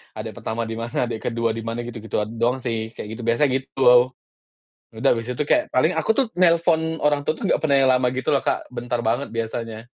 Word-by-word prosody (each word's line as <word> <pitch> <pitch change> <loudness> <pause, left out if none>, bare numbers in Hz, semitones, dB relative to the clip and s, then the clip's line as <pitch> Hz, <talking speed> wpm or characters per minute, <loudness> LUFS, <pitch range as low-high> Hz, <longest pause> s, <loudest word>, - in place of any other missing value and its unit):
Adek 110 0 -5
pertama 110 +1 -3
di 115 0 -5
mana, 115 +2 -2
adek 115 -2 -4
ke-2 115 -1 0
di 115 - -5
mana 115 +1 -3
gitu, 120 -1 -7
gituan 105 0 -3
doang 120 +3 +2
sih, 115 -2 -3
kayak - - -7
gitu 115 +2 -7
biasa 115 +5 +2
gitu. 135 +1 -4 1.2
Udah - - +1
habis 115 +1 -5
itu 125 +4 -1
kayak 305 0 +3
paling - - +2
aku 470 - -1
tuh 270 - +4
nelpon 170 -2 +4 0.2
orang 145 -1 +3
tua 155 - 0
tuh - - -7
nggak - - +2
pernah 145 -3 +3
yang - - +5
lama 125 0 +2
gitu 130 +3 -4
loh, 140 - +1
Kak, - - -1
bentar 120 0 -2
banget 120 +5 0
biasanya. 115 0 -4
120 Hz, 220 wpm, -22 LUFS, 115-135 Hz, 1.2 s, yang